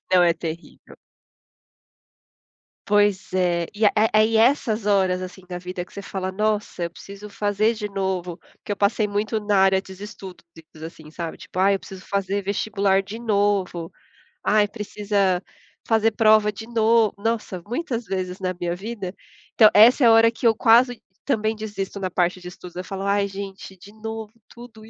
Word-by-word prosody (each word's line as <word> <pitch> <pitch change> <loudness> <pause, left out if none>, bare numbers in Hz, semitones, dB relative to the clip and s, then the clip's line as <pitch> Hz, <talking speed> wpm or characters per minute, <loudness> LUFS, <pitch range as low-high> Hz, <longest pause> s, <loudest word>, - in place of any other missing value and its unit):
Não, 180 -1 +6
é 170 -1 +4
terrível. 165 +1 -8 1.9
Pois 205 -1 +2
é. 175 -2 +1
E 210 +1 +1
é - - +7
é 220 +1 +3
aí 215 +1 +4
essas 225 -3 +2
horas, 190 -3 +2
assim, 185 +1 -8
da 180 -1 -5
vida 180 0 -6
que - - -22
você 200 - -7
fala: 190 -1 -5
"Nossa, 210 -3 -1
eu 170 - -2
preciso 200 +1 -11
fazer 205 +2 0
de 210 -1 -4
novo", 190 -3 -3 0.2
porque 205 - -5
eu - - -7
passei 205 +1 +1
muito 210 +2 -1
na 210 -1 0
área 190 0 +4
de 190 - -12
estudos, 195 -2 -10 0.4
assim, 155 -2 -11
sabe. 165 0 -6
Tipo: 185 - -7
"Ah, 195 +1 +4
eu 195 - +1
preciso 190 -1 -11
fazer 200 0 -1
vestibular 200 -1 +1
de 205 +3 -8
novo. 200 -6 0 0.5
Ai, 210 -1 +3
precisa 200 -3 -1 0.4
fazer 225 0 +3
prova 215 -1 +4
de 210 +2 -9
no" 225 -2 +3
nossa, 220 -5 -2
muitas 245 -3 -3
vezes 185 0 -4
na 185 -1 -1
minha 175 0 -2
vida. 195 -1 -6 0.4
Então 215 -2 +7
essa 235 +6 +7
é 235 - +7
a - - +7
hora 225 0 +6
que 235 +1 0
eu 225 - +4
quase, 240 +2 +4 0.2
também, 220 -5 0
desisto 205 -2 -5
na 185 -1 -2
parte 180 +1 0
de 180 - -9
estudo. 180 0 -11
Eu - - -4
falo: 195 +1 -6
"Ai, 200 0 +1
gente, 195 -1 -8
de 200 +3 -15
novo 220 0 -6 0.2
tudo 235 -2 -13
isso". 220 - -14
200 Hz, 180 wpm, -23 LUFS, 185-220 Hz, 1.9 s, é